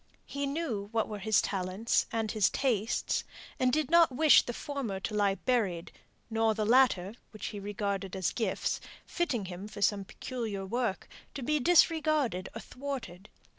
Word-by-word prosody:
He 280 0 -3
knew 275 -10 -3
what 225 -1 0
were 210 -1 -6
his 215 +1 +2
talents 195 +3 0
and 225 -2 -1
his 215 -4 +3
tastes; 230 -5 0 0.4
and 255 -1 +3
did 310 +1 0
not 335 -3 +6
wish 300 +4 +6
the - - -5
former 240 -6 -4
to 205 - -4
lie 205 -2 +2
buried, 200 -9 -1 0.4
nor 225 -1 +1
the 215 -1 -1
latter, 225 -5 +4 0.2
which 215 - -8
he 205 - -5
regarded 200 -1 -3
as 185 -3 0
gifts, 230 - -1 0.2
fitting 270 - -1
him 185 +2 -7
for 210 -1 -5
some 200 -1 +2
peculiar 215 -2 -5
work, 230 -1 -2 0.3
to 275 - -5
be 300 +4 +1
disregarded 310 - +3
or 225 - -5
thwarted. 250 -9 -7
225 Hz, 165 wpm, -30 LUFS, 200-265 Hz, 0.4 s, not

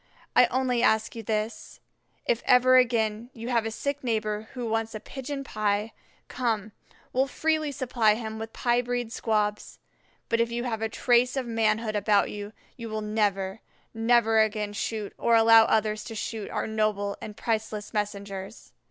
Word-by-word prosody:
I - - +7
only 255 -2 0
ask 220 -2 +2
you 230 - -5
this, 215 +1 -3 0.5
if 235 - +1
ever 255 +1 +6
again 230 -2 +2
you 230 +1 -7
have 230 -3 +1
a - - -1
sick 280 +5 -3
neighbor 215 -2 -1
who 245 -2 -3
wants 225 0 -1
a - - -4
pigeon 275 +4 -6
pie, 215 -2 -1 0.3
come, 225 -4 -2 0.4
we'll 265 +2 +2
freely 310 +1 0
supply 240 -5 +2
him 220 -1 -5
with 225 0 -6
pie 240 +1 +1
breed 245 -1 -3
squabs; 210 -2 -1 0.5
but 230 - +1
if 235 0 0
you 240 +1 -2
have 225 -3 -3
a 225 - -1
trace 245 +3 +2
of 260 - -1
manhood 225 -1 0
about 205 0 +2
you, 205 0 -6 0.3
you 230 -2 -6
will 215 0 -3
never, 205 -2 -1 0.3
never 225 -1 +3
again 210 -1 +1
shoot, 215 0 -3
or 235 - +3
allow 225 0 +7
others 215 -1 +1
to 225 - -7
shoot, 215 -1 -4
our - - -2
noble 215 -2 -1
and 210 0 -8
priceless 215 -2 -3
messengers." 200 -1 -5
225 Hz, 170 wpm, -27 LUFS, 215-240 Hz, 0.5 s, I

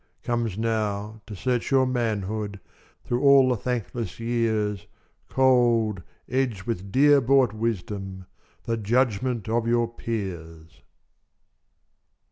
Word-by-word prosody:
Comes 115 -4 -1
now, 110 -1 -2
to 105 - -7
search 125 +4 -1
your 135 -1 +4
manhood 110 -4 -2 0.5
Through 120 0 -1
all 140 -2 +6
the 125 - +2
thankless 115 -4 -4
years, 110 -4 -1 0.4
Cold, 120 -6 +3 0.3
edged 125 -6 -1
with 100 -3 -4
dear 145 +3 +5
bought 130 -2 +3
wisdom, 100 -4 -4 0.4
The 115 -1 -1
judgment 120 0 0
of 115 +1 0
your 120 0 +2
peers! 85 - -6
115 Hz, 105 wpm, -25 LUFS, 100-125 Hz, 0.5 s, all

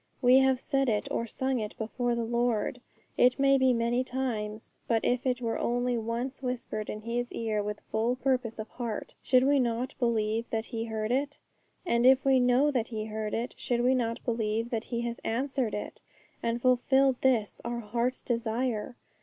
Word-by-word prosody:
We 255 0 +6
have 265 -1 +3
said 270 -1 0
it 210 -2 0
or 230 - -1
sung 260 +2 -1
it 210 -1 -5
before 240 +2 -1
the 235 - -1
Lord, 240 0 0 0.4
it 250 +1 +5
may 275 0 +4
be 260 0 +4
many 240 +1 +1
times; 225 -5 -4
but 225 -2 +1
if 250 +1 +1
it 250 -1 0
were 225 -1 -1
only 245 +1 0
once 235 +4 -3
whispered 250 -4 -4
in 210 - -5
His 240 +2 -3
ear 220 -2 -1
with 210 0 -4
full 225 +3 +1
purpose 255 -3 -1
of 215 0 -5
heart, 235 -4 -5
should 255 0 +4
we 280 +1 +4
not 245 +1 -1
believe 230 -2 0
that 225 0 -2
He 225 -1 -4
heard 220 0 -3
it? 280 +3 0 0.5
And 235 -8 +2
if 265 +1 +5
we 265 -1 +5
know 250 +4 +4
that 240 -5 0
He 215 -2 -4
heard 215 -1 -3
it, 235 +2 -3
should 240 -1 0
we 250 +2 +4
not 230 -3 -1
believe 230 0 -1
that 230 -1 -2
He 235 -1 -3
has 235 0 -3
answered 255 -1 -1
it, 210 - -6 0.4
and 230 +1 -1
fulfilled 260 +1 +4
this, 230 -7 +1
our 235 0 -3
heart's 235 +4 -2
desire? 235 0 -1
240 Hz, 190 wpm, -29 LUFS, 225-255 Hz, 0.5 s, We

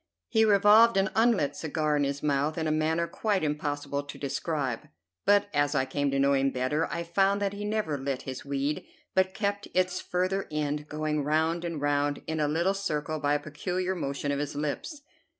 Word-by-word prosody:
He 220 0 +4
revolved 210 +2 +6
an 195 0 +2
unlit 220 - +3
cigar 155 -1 -1
in 145 -1 +2
his 140 +1 -3
mouth, 145 +2 +1
in 160 - -1
a 155 - +1
manner 160 +2 +1
quite 195 +3 -1
impossible 145 -1 -2
to 145 0 -10
describe; 140 -3 -2 0.4
but 205 0 +5
as 145 0 +1
I 130 - +2
came 145 +2 -1
to 135 - 0
know 140 +1 +3
him 135 0 +3
better 130 +5 0
I 170 - -2
found 195 +4 +2
that 200 -1 -1
he 205 +1 -5
never 210 -9 -1
lit 135 -1 -3
his 130 -1 -6
weed, 140 +1 -2 0.3
but 190 0 +2
kept 200 -1 -1
its 185 0 +1
further 185 +2 -1
end 150 -1 -2
going 150 -1 -1
round 160 +3 +1
and 170 -3 -3
round 145 0 0
in 160 0 -3
a 150 - +2
little 170 +6 +1
circle 155 -6 -2
by 145 0 +2
a - - +1
peculiar 180 +5 -3
motion 140 -4 -3
of 140 - -1
his 145 0 -3
lips. 150 - -3
155 Hz, 200 wpm, -28 LUFS, 145-185 Hz, 0.4 s, revolved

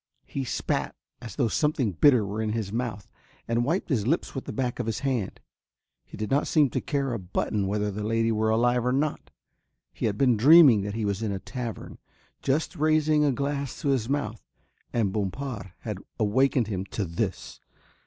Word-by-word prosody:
He 135 - -4
spat - - -2 0.3
as 115 - -8
though 130 -5 +2
something 135 -2 +1
bitter 120 - +4
were 105 +3 -3
in 110 -1 -1
his 110 -3 -3
mouth 115 -4 -3 0.4
and 115 +1 +1
wiped 165 +10 -1
his 115 -7 0
lips 165 +6 0
with 135 - -5
the - - -5
back 125 -3 -2
of 120 - -2
his 110 - -2
hand. 125 -8 -2 0.6
He - - -12
did 105 +2 -4
not 140 +2 +2
seem 145 -5 +3
to - - -1
care 140 -3 -1
a 115 - -2
button 95 +2 -2
whether 105 +1 -1
the 105 +2 -5
lady 115 +1 +1
were 110 0 +1
alive 120 +2 +2
or 125 - +1
not. 145 +3 -1 0.6
He - - -1
had 105 -1 -2
been 125 -3 +3
dreaming 140 -3 +8
that 100 +1 -4
he 110 -1 -1
was 100 0 -1
in 110 -2 -1
a 100 - -2
tavern, 120 +2 -6 0.4
just 140 +4 0
raising 155 0 +3
a 145 - +3
glass 140 0 -3
to 145 - +1
his 130 -4 +1
mouth, 145 +1 -2 0.5
and 105 -5 0
Bompard 105 0 -4
had 105 -4 -5 0.2
awakened 125 +3 +2
him 95 -3 -3
to 100 +1 -3
this. 95 +3 -4
115 Hz, 195 wpm, -26 LUFS, 105-140 Hz, 0.6 s, dreaming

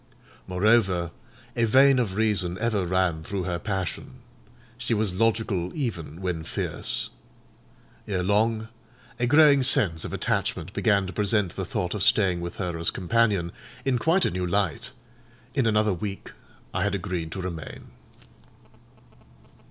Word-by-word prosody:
Moreover, 95 -3 +2 0.4
a 120 -1 +2
vein 135 +3 +5
of 105 -6 -1
reason 100 -5 +1
ever 110 -5 0
ran 90 -3 +1
through 95 +2 -3
her 90 -1 -2
passion: 95 +7 -4 0.6
she 120 -1 -1
was 105 -3 -1
logical 110 -5 +1
even 95 - -4
when 90 -4 -2
fierce. - - -2 1.0
Ere 95 -3 -1
long 110 +3 +1 0.5
a 120 - +1
growing 145 0 +6
sense 95 - +3
of - - -5
attachment - - -2
began 100 -3 +2
to 95 - -6
present 105 -2 +1
the - - -3
thought 90 -1 -2
of 105 - -4
staying 95 -4 +3
with 85 0 -5
her 90 -3 -3
as 85 - +2
companion 100 -3 +1 0.3
in 130 -3 +1
quite 170 +7 +2
a - - +1
new 90 0 -2
light; 100 +6 -1 0.6
in 135 -5 +1
another 105 -2 +2
week 100 +2 -5 0.4
I - - -1
had 105 -1 0
agreed 90 -3 -4
to 95 - -4
remain. 85 -3 -7
100 Hz, 145 wpm, -26 LUFS, 90-115 Hz, 1.0 s, growing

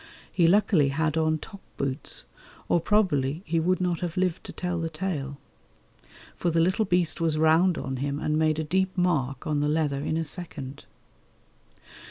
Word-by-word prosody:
He 170 -3 +3
luckily 180 -5 +4
had 155 +3 0
on 155 -1 +2
top 200 +5 -11 0.2
boots, 135 +1 -3 0.4
or 170 - +2
probably 165 -7 +1
he 165 0 0
would 180 +2 +1
not 180 -2 0
have 175 -1 -4
lived 180 -2 0
to - - -7
tell 180 -1 -3
the 165 0 -2
tale, 155 -5 -3 1.0
for 175 - 0
the 165 0 +1
little 185 +6 +2
beast 175 -2 +1
was 160 -2 +1
round 160 +3 +4
on 130 0 -3
him 140 +2 -2
and 150 - 0
made 155 -1 +2
a 160 - -1
deep 190 +4 0
mark 140 -8 0
on 150 -1 0
the 150 0 +1
leather 150 -3 0
in 155 +2 -1
a 165 - -1
second. 140 -4 -6
160 Hz, 180 wpm, -26 LUFS, 150-180 Hz, 1.0 s, luckily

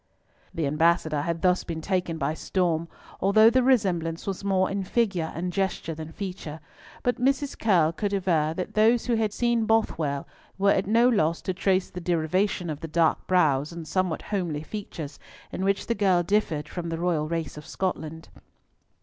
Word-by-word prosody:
The 165 - -2
Ambassador 155 0 +2
had 165 +2 -3
thus 180 0 +3
been 165 -1 -5
taken 180 -1 -1
by 150 0 -1
storm, 170 -1 -1 0.3
although 215 +3 +6
the 255 +1 +4
resemblance 185 -10 +1
was 195 -1 -4
more 190 -1 +2
in 195 0 -2
figure 185 -6 0
and 180 +1 -3
gesture 190 -3 -1
than 160 0 -8
feature, 180 -5 -6 0.4
but 245 0 0
Mrs. 270 +2 +1
Curll 175 -8 +3
could 200 +4 -2
aver 175 -6 +1
that 180 - -4
those 225 +2 +4
who 245 - +1
had 220 -2 +1
seen 235 0 +1
Bothwell 160 -11 0 0.3
were 200 +1 +4
at 190 - +1
no 230 +3 +4
loss 170 -9 +2
to 185 - -1
trace 190 0 +1
the 180 - -6
derivation 175 +1 0
of 150 - -5
the 165 - -6
dark 165 0 +1
brows 150 -5 +2
and 170 -2 -8
somewhat 185 -2 -1
homely 175 -7 -2
features, 160 -7 -7 0.3
in 190 - -3
which 195 0 +1
the 235 - 0
girl 190 -4 +2
differed 170 -6 0
from 170 +2 -5
the 165 - -3
royal 165 -3 0
race 165 -1 -3
of 150 0 -10
Scotland. 160 -4 -4
180 Hz, 180 wpm, -26 LUFS, 160-200 Hz, 0.4 s, although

